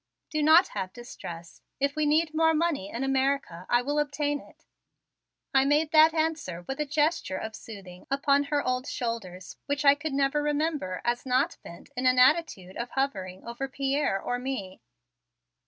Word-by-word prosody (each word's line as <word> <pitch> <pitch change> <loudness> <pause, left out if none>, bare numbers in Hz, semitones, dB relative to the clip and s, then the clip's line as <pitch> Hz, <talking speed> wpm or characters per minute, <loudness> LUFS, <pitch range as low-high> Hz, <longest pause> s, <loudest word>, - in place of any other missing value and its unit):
Do 305 -1 0
not 320 +5 +6
have 185 0 -5
distress. 170 -8 -10 0.2
If 280 +1 0
we 305 -1 +1
need 310 +1 +2
more 320 0 +3
money 305 - 0
in 235 +5 -4
America 270 -9 -1
I 240 0 +3
will 290 +3 0
obtain 290 0 -1
it." - - -19 0.9
I 270 0 +5
made 295 +3 +2
that 315 0 +7
answer 315 - -2
with 270 - -4
a 300 - -1
gesture 300 - 0
of 220 +2 -6
soothing 195 -5 -11
upon 280 +1 +2
her 290 0 0
old 255 +2 -1
shoulders 195 -7 -5
which 285 +1 -1
I 280 - +8
could 290 +1 -5
never 275 +1 +1
remember 295 - -1
as 240 0 0
not 265 +6 +1
bent 170 - -12
in 255 +1 +1
an 255 0 +4
attitude 250 - +3
of 235 +1 -4
hovering 190 -10 -3
over 235 +3 -4
Pierre 275 -5 0
or 245 +5 -3
me. 245 -8 -5
275 Hz, 170 wpm, -27 LUFS, 235-295 Hz, 0.9 s, I